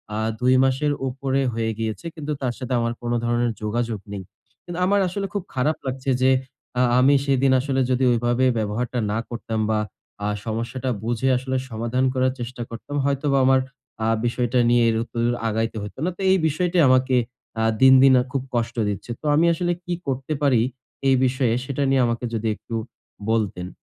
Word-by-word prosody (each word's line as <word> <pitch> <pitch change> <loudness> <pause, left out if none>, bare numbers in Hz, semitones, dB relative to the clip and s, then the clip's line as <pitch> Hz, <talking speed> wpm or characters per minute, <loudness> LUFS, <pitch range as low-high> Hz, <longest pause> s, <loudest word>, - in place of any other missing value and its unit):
আ - - -2 0.2
২ 125 +1 +3
মাসের 135 +3 +1 0.2
উপরে 135 +1 -1
হয়ে 110 0 -1
গেল। 110 -1 -1 0.3
কিন্তু 150 -1 -5
তার 125 -2 -1
সাথে 130 -1 -4
আমার 115 0 0
কোনো 120 0 -1
ধরনের 120 0 +1
যোগাযোগ 115 0 -1
নেই। 95 -2 -5 0.4
কিন্তু 175 0 -5
আমার 200 +1 +3
আসলে 195 +3 -3
খুব 200 -3 -2
খারাপ 145 +5 +1
লাগছে 130 +1 -3
যে, 130 0 +5 0.5
আ - - +4 0.2
আমি 140 +2 +5
সেদিন 135 -1 +3
আসলে 135 0 0
যদি 130 +1 +1
ঐভাবে 120 +2 +1
ব্যবহারটা 115 +4 -2
না 110 - 0
করতাম 115 -2 -4
বা 110 -1 +2 0.5
আ - - +1 0.2
সমস্যাটা 115 +4 -3
বুঝে 120 +3 0
আসলে 130 +1 -2
সমাধান 115 +3 -1
করার 130 0 +1
চেষ্টা 120 0 -6
করতাম 115 +5 -7
হয়তোবা 140 0 +1
আমার 130 0 +5 0.5
আ - - +1 0.2
বিষয়টা 120 +1 0
নিয়ে 120 0 +4
এর 110 - +1
উত্ত 120 - -17 0.3
আগাইতে 110 +1 -1
হইত 105 - -7
না। - - +1
তো, - - -8
এই 190 - +5
বিষয়টি 175 +4 0
আমাকে 130 0 +3 0.5
আ - - +2 0.2
দিন, 130 0 +8
দিন 135 -1 +7
আ - - -2
খুব 135 - -1
কষ্ট 115 0 -1
দিচ্ছে। 100 +4 -5
তো - - -11
আমি 165 +3 +4
আসলে 175 +1 -1
কি 175 - -2
করতে 135 +3 -2
পারি 130 -6 +4 0.5
এই 135 - +5
বিষয়ে 130 -2 +1
সেটা 140 +1 -2
নিয়ে 135 -1 +3
আমাকে 115 +1 -2
যদি 115 0 -1
একটু 115 - -8 0.6
বলতেন। 100 -5 -1
130 Hz, 185 wpm, -23 LUFS, 115-135 Hz, 0.6 s, দিন